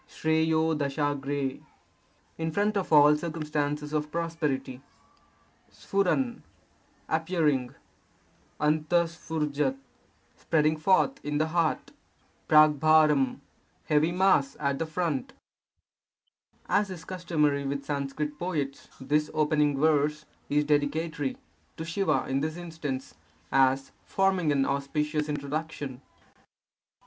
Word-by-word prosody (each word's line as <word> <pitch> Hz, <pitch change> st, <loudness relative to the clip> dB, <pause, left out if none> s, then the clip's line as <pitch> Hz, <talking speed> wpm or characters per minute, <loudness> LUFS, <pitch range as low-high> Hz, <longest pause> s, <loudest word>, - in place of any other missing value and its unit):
sN^TTO 145 Hz, -3 st, 0 dB, 0.4 s
— -, -, -38 dB
in 160 Hz, -, -1 dB
front 205 Hz, +4 st, 0 dB
of 195 Hz, -4 st, -2 dB
all 150 Hz, -1 st, +7 dB
circumstances 150 Hz, -2 st, -3 dB
of 150 Hz, 0 st, -1 dB
prosperity. 150 Hz, -6 st, -2 dB, 0.9 s
Pf^ 235 Hz, +6 st, 0 dB, 0.4 s
— -, -, -36 dB
appearing. 160 Hz, -6 st, 0 dB, 0.8 s
3T^T:'FJ3k^ 155 Hz, -2 st, 0 dB, 0.3 s
— -, -, -38 dB
spreading 155 Hz, -1 st, +2 dB
forth 190 Hz, -, +2 dB
in 150 Hz, 0 st, -2 dB
the 155 Hz, +1 st, +1 dB
heart. 165 Hz, -1 st, 0 dB, 0.6 s
WWi 155 Hz, -2 st, +5 dB, 0.2 s
— 80 Hz, +1 st, -39 dB
heavy 155 Hz, +2 st, +3 dB
mass 180 Hz, -7 st, +2 dB
at 140 Hz, -1 st, -1 dB
the 165 Hz, -, -2 dB
front. 160 Hz, -5 st, -2 dB, 1.3 s
As 205 Hz, -1 st, +2 dB
is 180 Hz, -2 st, -8 dB
customary 155 Hz, -6 st, 0 dB
with 140 Hz, 0 st, -3 dB
Sanskrit 145 Hz, +1 st, -3 dB
poets, 150 Hz, -6 st, -3 dB
this 150 Hz, +3 st, 0 dB
opening 150 Hz, -2 st, +2 dB
verse 150 Hz, 0 st, +2 dB, 0.2 s
is 150 Hz, +1 st, +2 dB
dedicatory 145 Hz, 0 st, -1 dB, 0.4 s
(to 160 Hz, -, -5 dB
Siva 190 Hz, +4 st, 0 dB
in 135 Hz, +1 st, 0 dB
this 155 Hz, +3 st, -3 dB
instance), 160 Hz, -6 st, -5 dB, 0.4 s
as 135 Hz, 0 st, +3 dB
forming 190 Hz, -5 st, +1 dB
an 135 Hz, -1 st, +2 dB
auspicious 150 Hz, +2 st, -1 dB
introduction. 145 Hz, -2 st, -4 dB
150 Hz, 105 wpm, -28 LUFS, 145-160 Hz, 1.3 s, all